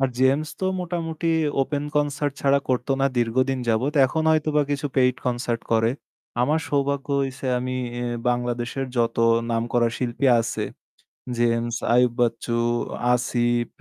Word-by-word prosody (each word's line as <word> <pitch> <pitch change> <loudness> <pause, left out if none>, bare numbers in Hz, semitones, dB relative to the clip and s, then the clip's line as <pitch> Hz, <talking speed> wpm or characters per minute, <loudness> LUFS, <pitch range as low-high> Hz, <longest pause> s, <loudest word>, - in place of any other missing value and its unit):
আর 135 - +3
James 135 +4 +3
তো - - -1 0.2
মোটামুটি 165 -2 -3 0.4
open 145 +1 -2
concert 145 -1 0
ছাড়া 140 0 +3
করতো 125 +1 -1
না 135 - +4
দীর্ঘদিন 130 +3 +1
যাবৎ 120 +6 +1
এখন 160 +5 -1
হয়তো 155 -1 +2
বা 150 - +5
কিছু 145 0 -1
paid 125 -1 +4
concert 120 -1 -1
করে। 115 0 +3 0.5
আমার 155 +5 +2
সৌভাগ্য 140 0 0 0.2
হইছে 135 0 -5
আমি 130 +1 -3 0.3
এ - - -2 0.3
বাংলাদেশের 120 +2 -1
যত 115 -1 +1 0.3
নামকরা 120 +1 +1
শিল্পী 125 +2 -1
আছে 115 - -3 0.7
জেমস, 115 0 +1 0.2
আইয়ুব 125 -1 +4
বাচ্চু, 120 0 0 0.6
আসিফ, 120 -1 +1
130 Hz, 140 wpm, -24 LUFS, 120-140 Hz, 0.7 s, বা